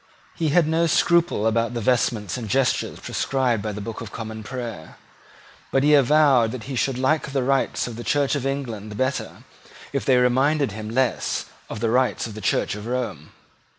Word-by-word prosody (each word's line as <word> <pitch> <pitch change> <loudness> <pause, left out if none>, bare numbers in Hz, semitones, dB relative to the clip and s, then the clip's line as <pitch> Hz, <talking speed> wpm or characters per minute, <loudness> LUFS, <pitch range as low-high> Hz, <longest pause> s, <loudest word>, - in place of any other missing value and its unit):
He 160 -2 -1
had 160 +1 +3
no 165 +1 +2
scruple 170 -7 +2
about 115 +2 +1
the - - -1
vestments 115 -2 0
and 115 -4 -5
gestures 135 +4 0
prescribed 125 -5 0
by 105 +1 -3
the 105 0 -6
Book 115 -1 -6
of 110 -3 -7
Common 110 -1 -6
Prayer. 115 -7 -7 0.7
But 135 - +2
he 150 +1 +5
avowed 140 -4 +5
that 125 -4 -6
he 135 +2 -5
should 125 +2 0
like 140 +2 0
the 135 -2 +1
rites 135 +1 +1
of 120 -2 -7
the 120 - -6
Church 145 +1 +1
of 140 -4 -1
England 115 -7 -4
better 130 +1 -2 0.5
if - - -1
they 130 - +4
reminded 130 +2 +2
him 110 +1 -6
less 130 +2 0 0.2
of 110 - -6
the 115 -1 +1
rites 125 +1 +1
of 115 - -7
the 110 - -8
Church 100 - 0
of 105 +2 -7
Rome. 120 - -4
125 Hz, 190 wpm, -23 LUFS, 110-135 Hz, 0.7 s, he